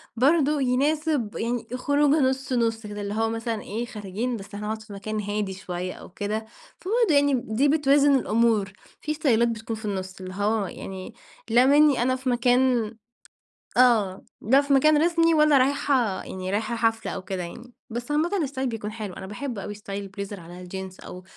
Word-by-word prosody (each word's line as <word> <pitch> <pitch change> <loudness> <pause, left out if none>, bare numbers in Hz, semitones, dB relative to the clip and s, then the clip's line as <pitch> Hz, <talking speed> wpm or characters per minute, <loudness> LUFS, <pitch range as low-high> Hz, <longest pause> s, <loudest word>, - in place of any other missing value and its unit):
برضو 290 +4 +3
يناسب 280 -1 +1
يعني 235 0 -2
خروجة 285 +3 +2
نُص 265 0 -3
نُص 225 -2 0
كده، 205 0 -6
اللي 200 0 -3
هو 225 +1 +1
مثلًا 225 -1 -3
إيه، 225 +4 -4
خارجين 220 +2 -4
بس 200 +1 -10
هنقعد 215 +1 -4
في 210 -1 -11
مكان 215 +2 -4
هادي 205 -1 -2
شوية 185 -1 -5
أو - - -12
كده، 210 +3 -3 0.3
فبرضو 440 -2 +1
يعني 285 0 +4
دي 250 +6 +2
بتوازن 285 -1 +4
الأمور. 225 -5 +2 0.3
في 305 - -3
استايلات 235 -6 +2
بتكون 225 0 -4
في 220 0 -9
النص، 190 -2 -4
اللي 185 0 -7
هو 205 +1 0
يعني 190 +4 -8 0.4
لا 240 +3 +5
منِّي 290 -1 +5
أنا 255 +1 +2
في 260 0 -3
مكان 245 -2 +2 0.8
آه، 220 -7 +3 0.2
لا 265 +6 +4
في 280 0 0
مكان 300 +3 +5
رسمي، 330 -1 +3
ولا 300 -2 +5
رايحة 265 -5 +1
يعني 185 0 -5
رايحة 215 +3 -1
حفلة 225 -1 0
أو 190 - -5
كده 190 -1 -4
يعني. 240 +8 -10 0.2
بس 240 +4 -5
عامةً 310 +4 +1
استايل 265 -1 -2
بيكون 215 -2 -5
حلو، 215 -4 -6
أنا 190 - -8
باحب 225 +2 -5
أوي 205 - -5
استايل 200 -1 -6
البليزر 200 0 -7
على 175 +2 -11
الجينز، 190 +1 -7
أو 180 0 -9
230 Hz, 180 wpm, -25 LUFS, 205-270 Hz, 0.8 s, لا